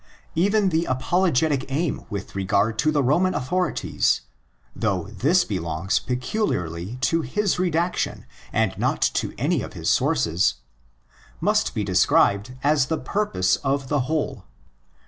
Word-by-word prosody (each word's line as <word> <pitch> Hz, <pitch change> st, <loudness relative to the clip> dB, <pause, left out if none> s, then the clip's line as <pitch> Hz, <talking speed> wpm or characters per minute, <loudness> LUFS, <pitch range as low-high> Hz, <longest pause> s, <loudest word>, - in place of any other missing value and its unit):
Even 200 Hz, +4 st, +2 dB
the 165 Hz, 0 st, +1 dB
apologetic 145 Hz, +1 st, +1 dB
aim 155 Hz, +3 st, -2 dB
with 100 Hz, -, -6 dB
regard 100 Hz, +3 st, 0 dB
to 155 Hz, -, +3 dB
the 145 Hz, -2 st, +1 dB
Roman 180 Hz, +8 st, +2 dB
authorities, 180 Hz, +8 st, 0 dB, 0.5 s
though 100 Hz, -5 st, 0 dB
this 145 Hz, -, +2 dB
belongs 85 Hz, -2 st, -1 dB
peculiarly 120 Hz, -, -2 dB
to 165 Hz, +5 st, +2 dB
his 185 Hz, -, -1 dB
redaction 175 Hz, 0 st, -1 dB, 0.3 s
and 110 Hz, -4 st, +1 dB
not -, -, 0 dB
to -, -, -2 dB
any -, -, +1 dB
of -, -, -7 dB
his -, -, -1 dB
sources, 85 Hz, +7 st, +2 dB, 0.8 s
must -, -, +2 dB
not -, -, -5 dB
be -, -, 0 dB
described 105 Hz, +6 st, +2 dB
as 145 Hz, -2 st, +3 dB
the 160 Hz, -, -1 dB
purpose 155 Hz, -, 0 dB
of 135 Hz, -1 st, -2 dB
the 145 Hz, -, +1 dB
whole. 140 Hz, -9 st, -2 dB
135 Hz, 135 wpm, -23 LUFS, 100-170 Hz, 0.8 s, to